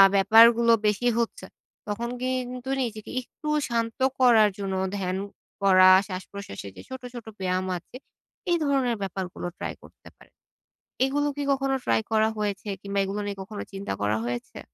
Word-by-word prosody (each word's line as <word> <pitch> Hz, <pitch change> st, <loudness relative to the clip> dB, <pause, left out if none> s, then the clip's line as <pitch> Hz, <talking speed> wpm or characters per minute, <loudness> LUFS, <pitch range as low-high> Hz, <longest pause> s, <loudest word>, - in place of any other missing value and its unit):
ব্যাপারগুলো 230 Hz, +3 st, +7 dB
বেশি 210 Hz, +4 st, +1 dB
হচ্ছে, 235 Hz, -, -2 dB, 0.4 s
তখন 230 Hz, +3 st, -3 dB
কিন্তু 255 Hz, 0 st, -3 dB
নিজেকে 220 Hz, -3 st, -6 dB
একটু 305 Hz, +5 st, -11 dB, 0.2 s
শান্ত 230 Hz, 0 st, -1 dB, 0.2 s
করার 230 Hz, -5 st, +6 dB
জন্য 195 Hz, -1 st, -2 dB, 0.2 s
ধ্যান 185 Hz, -1 st, -2 dB, 0.5 s
করা, 185 Hz, -1 st, +7 dB, 0.2 s
শ্বাসপ্রশ্বাসের 185 Hz, -, -7 dB
যে -, -, -8 dB
ছোটো, 260 Hz, -1 st, -7 dB
ছোটো 235 Hz, -2 st, -8 dB
ব্যায়াম 185 Hz, 0 st, -1 dB
আছে, 175 Hz, -, -15 dB, 0.6 s
এই 345 Hz, -, +4 dB
ধরনের 265 Hz, -5 st, +1 dB
ব্যাপারগুলো 185 Hz, -2 st, -4 dB
ট্রাই -, -, -4 dB
করতে -, -, -17 dB
পারেন। -, -, -21 dB, 0.7 s
এগুলো 290 Hz, +2 st, 0 dB
কি 290 Hz, -, -1 dB
কখনো 270 Hz, 0 st, +1 dB
ট্রাই -, -, +2 dB
করা 220 Hz, 0 st, +3 dB
হয়েছে 205 Hz, -1 st, -3 dB
কিংবা 200 Hz, 0 st, -2 dB
এগুলো 200 Hz, +2 st, -3 dB
নিয়ে 200 Hz, -1 st, -4 dB
কখনো 205 Hz, +2 st, -6 dB
চিন্তা 195 Hz, -, -4 dB
করা 105 Hz, +1 st, +1 dB
হয়েছে? 120 Hz, 0 st, -5 dB
215 Hz, 150 wpm, -26 LUFS, 195-245 Hz, 0.7 s, ব্যাপারগুলো